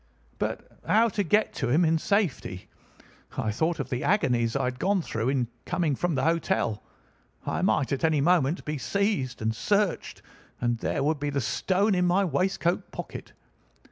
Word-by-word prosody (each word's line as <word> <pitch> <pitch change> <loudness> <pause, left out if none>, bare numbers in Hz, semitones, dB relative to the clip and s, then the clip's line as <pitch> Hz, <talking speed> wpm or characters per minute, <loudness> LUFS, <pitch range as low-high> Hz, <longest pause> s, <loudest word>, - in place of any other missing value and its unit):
But - - -4
how 220 +6 +4
to 205 0 -1
get 210 +4 +2
to 130 - -2
him 160 +7 +4
in 160 0 +2
safety? 165 - -1 0.7
I 110 - 0
thought 160 +9 0
of - - -2
the 125 -1 -2
agonies 125 - +2
I - - +1
had 125 0 -2
gone 195 +1 +1
through 115 -2 -2
in 130 -3 +1 0.2
coming 175 -5 0
from 175 +3 -1
the 135 - 0
hotel. 165 - 0 0.6
I - - -1
might 135 - +1
at 140 - -1
any 160 -2 +3
moment 165 +1 +2
be 150 -1 -3
seized 195 - -1
and 110 0 0
searched, 205 - 0 0.4
and 120 -1 0
there - - -1
would 150 +1 +1
be 145 0 -1
the 140 -1 -1
stone 190 - +1
in 180 -1 +2
my 190 +3 +3
waistcoat 175 +2 0
pocket. - - -8
160 Hz, 175 wpm, -27 LUFS, 130-190 Hz, 0.7 s, how